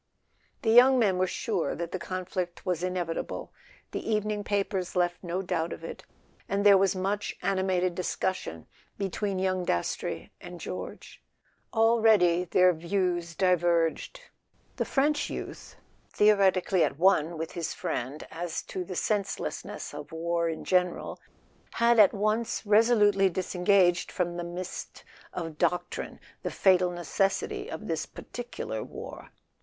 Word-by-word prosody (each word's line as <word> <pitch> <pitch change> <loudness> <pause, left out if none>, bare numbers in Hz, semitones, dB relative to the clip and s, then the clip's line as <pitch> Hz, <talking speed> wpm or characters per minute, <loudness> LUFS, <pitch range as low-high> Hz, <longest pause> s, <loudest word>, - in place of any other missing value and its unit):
The 220 - +3
young 255 +3 +7
men 200 -6 +2
were 185 - +2
sure 190 -1 -2
that 170 -1 -5
the 185 - -3
conflict 185 -1 -4
was 180 -3 -1
in¬ 185 0 -2
evitable—the 170 +5 -5
evening 210 -1 0
papers 195 -3 -1
left 175 0 0
no 180 +2 -2
doubt 165 -2 -1
of - - -7
it—and 200 +1 -6
there 200 -1 +9
was 195 0 +2
much 200 +2 -2
animated 185 -2 +1
discussion 180 - -3 0.3
between 195 0 -2
young 185 -1 0
Das 85 - 0
trey - - -6
and - - -9
George. - - -7 0.5
Already 220 -6 +4
their 180 +1 +4
views 175 0 -1
diverged; 175 - +1 0.6
the - - 0
French 290 +2 +1
youth, - - -7 0.3
theoretically 195 -4 +3
at 140 -2 -1
one 170 -2 +3
with 160 +1 -4
his 170 -2 -4
friend 135 +5 -4
as 170 0 -4
to 185 - -5
the 185 +1 -7
senseless¬ 200 0 -1
ness 205 -5 -7
of 145 0 -8
war 170 +1 -1
in 160 - -5
general, 180 -1 0 0.5
had 235 0 +4
at 205 - +8
once 215 +3 -1
resolutely 210 -2 +4
disen¬ 180 0 -4
gaged 180 -3 +4
from 175 -2 -1
the 175 - -3
mist 175 +2 -7 0.3
of 165 -3 -6
doctrine 175 0 -1 0.2
the - - -2
fatal 185 -2 +3
necessity 175 +3 -1
of 215 - -6
this 160 -2 -2
particular 240 - -6
war. - - -9
185 Hz, 140 wpm, -28 LUFS, 175-200 Hz, 0.6 s, there